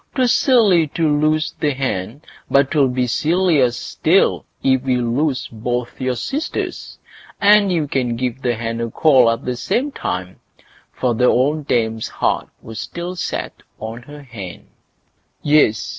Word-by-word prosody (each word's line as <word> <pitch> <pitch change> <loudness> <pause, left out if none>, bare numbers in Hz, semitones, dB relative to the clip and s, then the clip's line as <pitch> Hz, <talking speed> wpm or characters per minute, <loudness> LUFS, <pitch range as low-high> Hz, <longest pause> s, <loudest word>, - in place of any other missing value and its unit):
'Twas 255 -3 +3
silly 205 - +4
to 160 +2 -1
lose 155 +1 +1
the 145 -3 0
hen, 130 +1 -3 0.3
but 140 0 +3
'twill 145 -4 +3
be 125 0 0
sillier 155 0 +2
still 160 +9 +1 0.2
if 130 -1 +3
we 130 -1 0
lose 125 +4 -1
both 120 +3 -4
your 130 -1 0
sisters; 285 - -4 0.4
and 205 -1 +5
you 160 -4 0
can 125 -4 -1
give 125 +1 -3
the 120 -3 0
hen 115 +1 -4
a 115 - -2
call 130 -2 +4
at 115 0 -2
the 125 - -2
same 240 - -1
time"—for 95 - -5
the 125 +2 +1
old 140 +4 +2
dame's 110 -2 0
heart - - -1
was 110 -1 -8
still 175 +1 -5
set 175 - -4 0.2
on 110 +2 -6
her 145 +3 -12
hen. 100 -9 -9 0.8
Yes! 145 -7 +4
130 Hz, 150 wpm, -19 LUFS, 120-155 Hz, 0.8 s, and